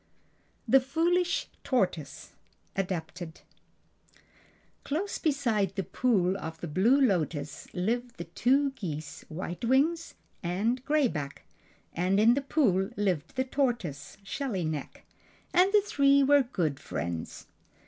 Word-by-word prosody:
THE 270 +4 +7
FOOLISH 340 +7 +1 0.2
TORTOISE 180 - -1 0.4
(Adapted) 175 -3 -4 1.4
Close 350 +8 -2
beside 230 - 0
the 195 - -1
Pool 190 -3 +1
of 160 -1 -6
the 170 - -5
Blue 205 - +3
Lotus 160 - 0
lived 235 +6 -2
the 170 - -4
two 265 +11 +2
geese 155 - -6
White 175 +4 -6
Wings 295 +7 +2 0.3
and 210 +8 -1
Gray 300 -2 +3
Back, 145 -9 -5 0.5
and 185 +3 +1
in 225 +3 +6
the 280 - 0
pool 215 - +2
lived 185 - -1
the 260 - +1
tortoise 240 - -2
Shelly 195 - -3
Neck, 155 -2 -5 0.5
and 370 +2 +5
the 420 0 +5
three 280 -5 +4
were 285 +1 +6
good 155 - -1
friends. 85 -1 -5
210 Hz, 120 wpm, -29 LUFS, 170-275 Hz, 1.4 s, THE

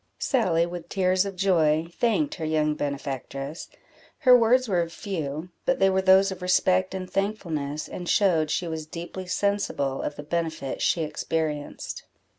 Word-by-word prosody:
Sally, 185 - +2
with 175 -1 -7
tears 185 0 +2
of 195 - -6
joy, 165 -5 +2
thanked 245 +5 +2
her 165 - -6
young 155 -1 +1
benefactress; 140 0 -5 0.5
her 255 -4 +8
words 245 +2 +4
were 175 -4 +1
few, 165 -3 -5
but 265 - +1
they 195 0 +4
were 190 0 +2
those 190 +1 +5
of 185 -1 -7
respect 185 +1 +2
and 185 -1 -4
thankfulness, 165 -8 -2
and 175 -1 -6
showed 165 -7 +3
she 175 - -1
was 160 -1 -5
deeply 175 +3 -7
sensible 180 -9 -1
of 145 - -3
the 145 - -8
benefit 160 -3 -3
she 165 - +2
experienced. 155 -1 -3
175 Hz, 155 wpm, -26 LUFS, 155-190 Hz, 0.5 s, her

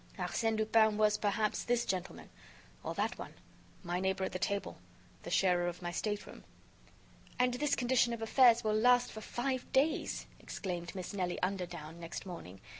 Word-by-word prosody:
Arsène 225 -1 0
Lupin 220 0 +4
was, 210 -1 +4
perhaps, 210 +1 0
this 240 0 +1
gentleman.... 185 -1 -4 0.5
or - - -4
that - - -1
one.... - - -8 0.5
my 175 0 -1
neighbor 190 0 0
at 190 - -1
the 185 - -4
table.... 200 +2 -2 0.4
the - - -7
sharer 180 -2 +3
of 175 +1 -5
my 175 - -2
stateroom.... 205 +3 -4 0.9
"And 250 0 +3
this 285 +3 +1
condition 245 -1 +2
of 235 - -3
affairs 235 0 +5
will 215 -1 +1
last 245 +3 +4
for 220 - -8
five 255 +3 -3
days!" 285 +4 +1
exclaimed 175 -3 -5
Miss 185 0 -5
Nelly 180 -3 -1
Underdown, 175 -4 -3
next 170 +3 -6
morning. 95 - -9
210 Hz, 165 wpm, -33 LUFS, 180-235 Hz, 0.9 s, affairs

